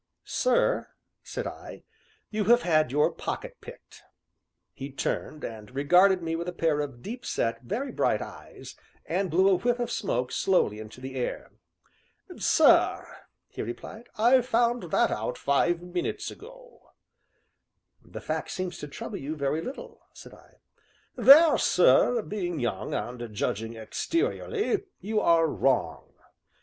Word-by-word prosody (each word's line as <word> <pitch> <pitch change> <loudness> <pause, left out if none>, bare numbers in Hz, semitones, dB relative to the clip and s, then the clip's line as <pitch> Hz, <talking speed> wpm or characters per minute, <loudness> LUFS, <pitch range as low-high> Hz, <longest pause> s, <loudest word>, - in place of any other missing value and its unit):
"Sir," - - +1 0.3
said - - -6
I, - - -9 0.5
"you 215 -1 -1
have 240 +3 +5
had 155 -6 +2
your 150 +2 +2
pocket - - -6
picked." 480 - -13 0.7
He 135 +1 -7
turned 150 +2 -3
and 110 -2 -7
regarded 180 +6 +4
me 165 0 -2
with 170 +1 -4
a - - -7
pair 160 -3 0
of 140 -5 -5
deep 235 +3 -7
set, 115 0 -2
very 245 - -4
bright - - +1
eyes, - - -10 0.3
and 185 +3 -1
blew 185 +4 +3
a 195 - +5
whiff 240 +6 0
of 240 -1 -3
smoke 125 - -2
slowly 110 - +1
into 110 +3 -10
the 130 0 -7
air. 125 - -4 0.8
"Sir," - - +4 0.4
he - - -7
replied, 210 - -8
"I 245 +4 +5
found 235 -5 0
that - - +2
out 110 +3 -3
five 170 +5 +1
minutes 180 0 -3
ago." - - -14 1.2
"The - - -10
fact - - -3
seems 185 -2 -4
to 150 - -6
trouble 140 - -7
you 145 +3 -5
very 150 +2 -1
little," 260 +10 -8
said - - -13
I. - - -19 0.6
"There, 305 +3 +7
sir, 180 - +4
being 175 -7 -4
young, 115 -6 -3
and 120 +1 -5
judging 110 +3 -2
exteriorly, 400 - -2 0.2
you 210 +3 -1
are 165 -3 +4
wrong. 125 - -1
175 Hz, 140 wpm, -27 LUFS, -, 1.2 s, There